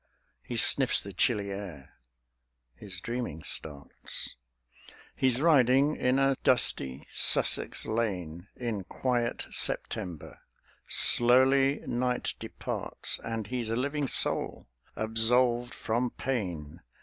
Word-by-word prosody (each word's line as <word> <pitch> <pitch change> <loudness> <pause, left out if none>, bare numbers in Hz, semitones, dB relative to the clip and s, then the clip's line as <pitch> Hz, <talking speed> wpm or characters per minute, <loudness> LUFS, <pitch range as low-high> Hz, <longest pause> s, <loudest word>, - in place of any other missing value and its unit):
He - - -6
sniffs - - +3
the 100 - -9
chilly 100 +1 0
air; 85 -9 -8 0.8
(his 90 +9 -8
dreaming 115 -8 -5
starts). 70 -2 -5 0.8
He's 130 -1 +1
riding 140 -2 +4
in 125 +1 +1
a 135 0 +2
dusty 70 - +1
Sussex - - +3
lane 90 -6 -3
In 115 -5 -4
quiet 120 +2 -2
September; 85 -4 0 0.5
slowly 135 +3 +4
night 125 +1 -1
departs; - - -4
And 115 -2 -4
he's 120 0 -4
a 115 - -1
living 140 +3 -2
soul, - - 0 0.3
absolved 120 +2 +1
from 120 +3 -1
pain. 90 - -5
120 Hz, 100 wpm, -28 LUFS, 95-125 Hz, 0.8 s, riding